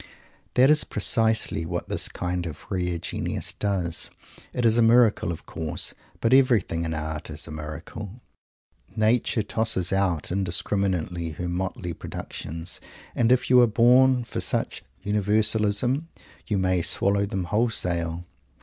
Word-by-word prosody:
That 130 +3 +6
is 150 - +4
precisely 110 -3 +1
what 85 +2 -4
this - - -1
kind 90 -1 -3
of 80 -2 -9
rare 90 -2 -1
genius - - -3
does. 95 -5 -2 0.4
It 125 - -1
is 115 +1 +4
a - - +5
miracle, 115 -3 +4
of 85 - -7
course, 80 -2 -4 0.3
but 115 +2 +3
everything 120 -11 +3
in 80 -1 -2
art 75 0 -4
is 75 0 -5
a - - -8
miracle. 80 - -7 0.8
Nature 110 0 +2
tosses 105 -4 +1
out 95 -6 0
indiscriminately 90 -2 0
her 90 +4 -4
motley 90 +1 -3
productions, 80 +1 -6 0.3
and 120 0 +2
if 125 - +3
you 125 -1 +8
are 120 - +6
born 125 +3 +5
for 115 - -4
such - - -2 0.2
"universalism," 105 - +1 0.4
you 105 -3 0
may 95 -1 +1
swallow 100 +3 +2
them 95 -2 -2
wholesale. 90 -5 -1
100 Hz, 140 wpm, -25 LUFS, 85-115 Hz, 0.8 s, you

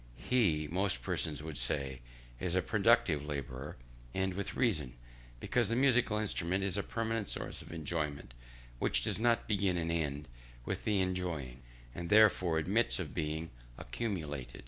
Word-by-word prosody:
He, 80 - +2
most 90 -9 0
persons 75 +2 -1
would 80 -4 -5
say, 65 +1 -1 0.4
is 90 -1 -1
a 95 - +2
productive 110 -8 +3
labourer; 70 -2 -5 0.4
and 95 0 0
with 100 +1 -4
reason; 75 - 0 0.4
because 120 - +1
the 115 - +1
musical 125 -4 +3
instrument 95 -3 0
is 95 -2 0
a 100 - +1
permanent 115 -1 -2
source - - -3
of - - -10
enjoyment, 75 -4 -3 0.5
which - - +2
does - - 0
not 115 0 +2
begin 100 -4 +1
and 85 -1 -1
end 75 -4 -2 0.4
with - - -3
the 105 -3 +2
enjoying, 85 -9 -2 0.3
and 85 -1 -5
therefore 100 -6 +5
admits 100 +9 +2
of 90 -5 -5
being 80 0 -2 0.3
accumulated. 75 - -4
85 Hz, 150 wpm, -33 LUFS, 75-105 Hz, 0.5 s, therefore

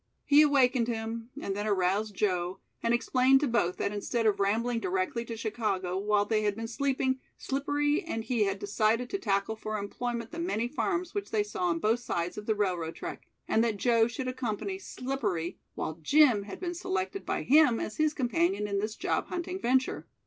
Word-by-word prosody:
He 290 +1 +7
awakened 260 -5 +4
him 225 0 -4
and 195 -8 -3
then 205 +1 -2
aroused 200 +1 +1
Joe, 185 -2 0 0.2
and 230 - +1
explained 255 +2 +4
to 295 - +2
both 230 -7 +1
that - - -1
instead 225 +3 -1
of 215 -2 +3
rambling 230 +4 +1
directly 190 +3 -1
to 230 -1 -6
Chicago, 210 -5 -2
while 205 +1 +2
they 215 0 +1
had 205 -1 0
been 225 +1 -4
sleeping, 260 +2 0 0.2
Slippery 290 +3 0
and 225 -9 -3
he 225 -2 +1
had 195 0 -1
decided 215 +4 0
to 395 - -1
tackle 200 - 0
for 215 0 -4
employment 230 +3 -4
the 335 - -6
many 290 - -1
farms 350 +6 -2
which 405 -1 -3
they 215 -2 +1
saw 205 -3 -3
on 170 -1 +1
both 220 +7 +2
sides 175 -7 -2
of 210 - -7
the 220 - +2
railroad 180 -5 -1
track, - - -7 0.2
and 225 - +3
that 225 -3 0
Joe 230 +1 +3
should 245 +2 -4
accompany 255 - -3
Slippery, 235 - -3 0.2
while 155 - -3
Jim 245 - +5
had 200 - -8
been 350 -1 -3
selected 375 +2 -3
by - - -2
him 285 -4 +5
as 215 - -4
his 310 0 +2
companion 310 - +1
in 200 -1 -1
this 215 +2 -2
job - - -1
hunting 360 +1 -4
venture. 260 +2 +1
230 Hz, 195 wpm, -29 LUFS, 205-265 Hz, 0.2 s, He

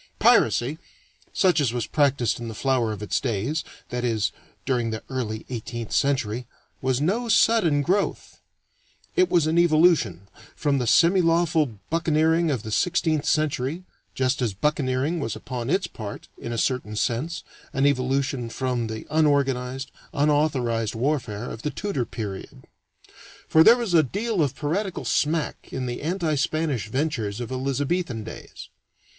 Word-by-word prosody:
Piracy, 140 +7 +3 0.5
such 180 -5 +3
as 125 -5 +1
was 120 -2 -1
practiced 140 -6 +1
in 120 - -5
the 110 - -6
flower 125 -3 +1
of 105 -1 -6
its 105 - 0
days 130 +6 -1 0.3
that 125 0 -3
is, 110 -5 0 0.3
during 125 -3 0
the 110 -1 -5
early 110 -4 -3
eighteenth 120 -2 -5
century 125 -4 0 0.3
was 130 -1 +1
no 215 +11 0
sudden 200 -10 +4
growth. 195 +6 -1 0.8
It 370 -1 +4
was 170 -3 +3
an 160 +2 +2
evolution, 160 - +4 0.3
from 145 -2 +1
the 125 - -1
semilawful 165 - +3
buccaneering 160 0 +2
of 130 -7 -1
the 110 - -6
sixteenth 160 - +1
century, 155 +2 0 0.3
just 130 +1 0
as 110 -6 -1
buccaneering 145 - 0
was 115 -7 -3
upon 125 -1 -5
its 190 +4 +2
part, 105 -3 -8
in 120 - -7
a 120 - -3
certain 120 -3 -1
sense, 135 +10 -1 0.3
an 135 0 +1
evolution 135 -2 0
from 125 -1 -2
the 110 0 -6
unorganized, 135 -3 +1 0.2
unauthorized 140 -7 +1
warfare 120 -4 -1
of 110 - -7
the 150 - -2
Tudor 145 -4 -2
period. 105 -4 -7 0.8
For 160 - +6
there 235 +6 +8
was 230 -7 -2
a 165 - +7
deal 200 - -1
of 140 -4 0
piratical 180 +6 -2
smack 155 +1 0
in 130 - -3
the 120 -1 -4
anti 165 0 -1
Spanish 150 -5 -1
ventures 120 -5 -2
of 120 0 -5
Elizabethan 135 0 -1
days. 110 - -10
135 Hz, 150 wpm, -24 LUFS, 120-160 Hz, 0.8 s, there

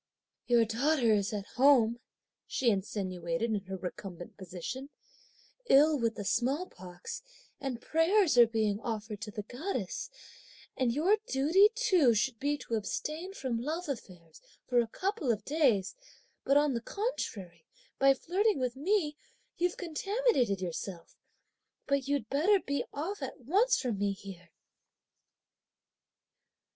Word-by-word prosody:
"Your 235 -2 +5
daughter 240 +1 +2
is 200 -1 +1
at 205 -2 -4
home," 245 -4 +5 0.5
she 245 -3 +2
insinuated 190 0 -2
in 200 -2 -2
her 190 0 -5
recumbent 180 -1 -7
position, 190 +9 -7 0.8
"ill 300 +3 +6
with 230 -1 0
the 205 - -6
small 260 - +1
pox, 180 - -9 0.4
and 260 -4 -4
prayers 325 - +3
are 240 -1 +8
being 215 -2 0
offered 215 -2 -5
to 225 - -5
the 210 0 -5
goddess; 390 - -4 0.7
and 255 -2 +1
your 350 - +3
duty 325 +10 +5
too 365 - +4
should 230 +1 0
be 290 +1 0
to 235 - -8
abstain 310 - -3
from 240 - -2
love 320 +7 -3
affairs 180 - -8 0.2
for 245 -1 +2
a 235 - +1
couple 375 - -1
of 215 -2 -3
days, 265 - +2 0.5
but 275 - +4
on 290 -1 +3
the 235 - -2
contrary, 200 - -4 0.3
by 275 0 +6
flirting 400 +9 +1
with 250 -1 -1
me, 305 +1 0 0.4
you've 350 0 0
contaminated 355 - 0
yourself! 175 0 -6 0.7
but, 280 -1 0
you'd 280 -6 0
better 340 - +3
be 280 -5 -2
off 325 +6 -4
at 265 -1 -6
once 425 - +3
from 235 -7 -2
me 200 -1 +1
here!" 190 -3 -11
250 Hz, 135 wpm, -31 LUFS, 205-315 Hz, 0.8 s, are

